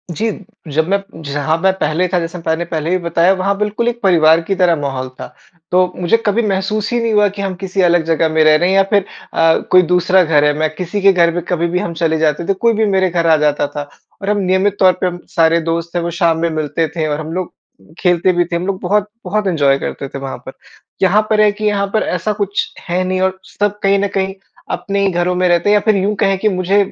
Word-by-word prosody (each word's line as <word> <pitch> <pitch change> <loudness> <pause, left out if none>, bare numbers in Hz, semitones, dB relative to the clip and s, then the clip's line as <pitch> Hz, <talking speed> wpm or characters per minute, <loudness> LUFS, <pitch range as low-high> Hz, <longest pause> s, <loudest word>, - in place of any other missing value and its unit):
जी, 225 +5 -1 0.4
जब 160 +3 0
मैं 200 0 +2 0.2
जहाँ 145 +2 -1
मैं 190 - +4
पहले 160 +2 0
था, 180 0 0
जैसे 170 +1 -5
मैंने 160 +1 -1
पहले 160 -1 -3
भी 185 - +2
बताया, 170 +2 +2
वहाँ 195 +1 -1
बिल्कुल 210 +3 -1
एक 240 0 -1
परिवार 165 -4 +4
की 195 +4 -2
तरह 180 -2 +3
माहौल 130 -2 -3
था। - - -6 0.4
तो, 180 0 +2
मुझे 180 +5 +2
कभी 210 +3 +2
महसूस 200 +3 -1
ही 240 - +1
नहीं 230 -1 0
हुआ 210 -1 +4
कि 200 +1 -7
हम 190 -2 -3
किसी 190 0 -1
अलग 175 -2 +3
जगह 165 0 +1
में 160 0 +2
रह 155 0 +5
रहे 175 +4 +2
हैं 190 - +2
या 195 - +5
फिर 200 -2 +3 0.3
अ, 165 0 +3
कोई 185 0 +7
दूसरा 180 +1 +3
घर 150 -3 +2
है, 150 - +3
मैं 155 0 +1
किसी 185 +3 -4
के 195 0 +5
घर 170 -2 +3
पे, 175 - -1
कभी 170 -1 0
भी 180 +1 -1
हम 175 -4 -4
चले 160 -1 0
जाते 155 +1 0
थे, 195 - +2
कोई 230 +4 +1
भी 220 0 +1
मेरे 190 -2 +1
घर 170 -1 0
आ 160 - +5
जाता 150 -1 +1
था। 145 0 -7 0.3
और 200 - -3
हम 210 - +1
नियमित 190 +2 +1
तौर 185 -1 +5
पे 185 - +2
हम, 175 0 -5 0.2
सारे 165 0 +4
दोस्त 165 +1 -3
थे, 175 - +1
वो 170 0 -3
शाम 165 -2 +3
में 170 0 0
मिलते 155 0 -2
थे 160 -2 -1
और 150 0 -2
हम 155 +1 -6
लोग 185 0 -4 0.5
खेलते 180 0 +2
भी 175 0 +1
थे। 170 0 -4
हम 175 +3 -2
लोग 195 -1 -2
बहुत 205 +2 0 0.2
बहुत 205 +2 -1
इंजॉय 145 -6 +2
करते 140 - -5
थे, 140 - -8
वहाँ 135 -2 -6
पर। - - -7 0.5
यहाँ 195 +3 +4
पर 215 -1 +3
है 210 - +4
कि, 215 +1 -6
यहाँ 200 -1 +1
पर 220 - +2
ऐसा 180 +4 -2
कुछ 200 0 -2 0.2
है 180 +2 0
नहीं 185 0 -1
और 190 0 0 0.2
सब 205 0 0
कहीं 195 0 +3
न 200 - 0
कहीं 190 0 -1 0.4
अपने 200 0 -2
ही 195 -1 +2
घरों 175 +1 0
में 180 0 +1
रहते 175 +3 +2
हैं 210 - +5
या 210 - +5
फिर 215 0 +2
यूँ 200 +2 0
कहें 195 -1 +2
कि 215 +2 +2
मुझे 185 +1 0
180 Hz, 260 wpm, -16 LUFS, 165-195 Hz, 0.5 s, कोई